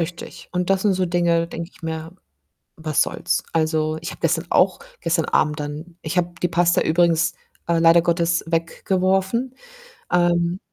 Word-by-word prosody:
Richtig, 170 Hz, +1 st, -6 dB
und 180 Hz, +1 st, -1 dB
das 195 Hz, -1 st, +3 dB
sind 205 Hz, -3 st, +3 dB
so 185 Hz, 0 st, 0 dB
Dinge, 170 Hz, -1 st, +1 dB
denke 170 Hz, 0 st, -6 dB
ich -, -, -22 dB
mir: 160 Hz, +1 st, -5 dB, 0.6 s
„Was 155 Hz, -2 st, 0 dB
soll's?“ -, -, 0 dB
Also, 155 Hz, -1 st, 0 dB
ich 165 Hz, -, -6 dB
habe -, -, -11 dB
gestern 165 Hz, 0 st, +1 dB
auch 185 Hz, 0 st, +3 dB, 0.2 s
gestern 165 Hz, -1 st, +1 dB
Abend 150 Hz, 0 st, +1 dB
dann 150 Hz, +4 st, -7 dB
ich 155 Hz, +3 st, -3 dB
habe 175 Hz, 0 st, +1 dB
die 175 Hz, -, +2 dB
Pasta 175 Hz, +1 st, +2 dB
übrigens, 170 Hz, 0 st, +2 dB, 0.3 s
äh, 170 Hz, -1 st, +2 dB
leider 165 Hz, 0 st, +6 dB
Gottes 170 Hz, 0 st, +1 dB
weggeworfen. 190 Hz, +8 st, 0 dB, 0.6 s
Ähm, 175 Hz, 0 st, +2 dB
170 Hz, 160 wpm, -22 LUFS, 165-180 Hz, 0.6 s, leider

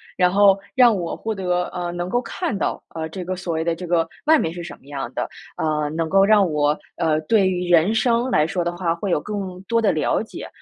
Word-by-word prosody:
然 180 Hz, -1 st, +3 dB
后 200 Hz, 0 st, +5 dB, 0.2 s
让 245 Hz, -4 st, +6 dB
我 175 Hz, -3 st, -3 dB
获 220 Hz, -1 st, -4 dB
得 180 Hz, -2 st, 0 dB
呃， 175 Hz, -1 st, -3 dB
能 175 Hz, 0 st, -4 dB
够 245 Hz, +5 st, +1 dB
看 230 Hz, -2 st, -3 dB
到， -, -, -2 dB
呃， 160 Hz, -1 st, -3 dB
这 180 Hz, +2 st, -6 dB
个 185 Hz, +1 st, -2 dB
所 180 Hz, -2 st, -4 dB
谓 160 Hz, 0 st, -1 dB
的 170 Hz, -1 st, 0 dB
这 180 Hz, +2 st, -7 dB
个 170 Hz, -1 st, +1 dB, 0.2 s
外 315 Hz, 0 st, +6 dB
面 160 Hz, -, -2 dB
是 175 Hz, 0 st, -7 dB
什 -, -, -8 dB
么 -, -, -25 dB
样 140 Hz, -1 st, -6 dB
的， -, -, -2 dB, 0.3 s
呃， 150 Hz, -1 st, 0 dB
能 160 Hz, +2 st, -2 dB
够 195 Hz, +3 st, +4 dB
让 200 Hz, -2 st, +4 dB
我， 150 Hz, 0 st, +1 dB, 0.2 s
呃， 155 Hz, -2 st, +1 dB
对 200 Hz, +5 st, +3 dB
于 180 Hz, -1 st, -2 dB
人 175 Hz, +4 st, +4 dB
生 235 Hz, +2 st, +1 dB
来 150 Hz, 0 st, +3 dB
说 175 Hz, +1 st, -1 dB
的 175 Hz, 0 st, -2 dB
话， 170 Hz, -2 st, 0 dB
会 190 Hz, +2 st, -3 dB
有 -, -, +2 dB
更 190 Hz, 0 st, -5 dB
多 230 Hz, +3 st, +1 dB
的 215 Hz, -, +3 dB
了 155 Hz, +6 st, 0 dB
解， 220 Hz, -, -8 dB
180 Hz, 265 characters per minute, -22 LUFS, 165-200 Hz, 0.3 s, 让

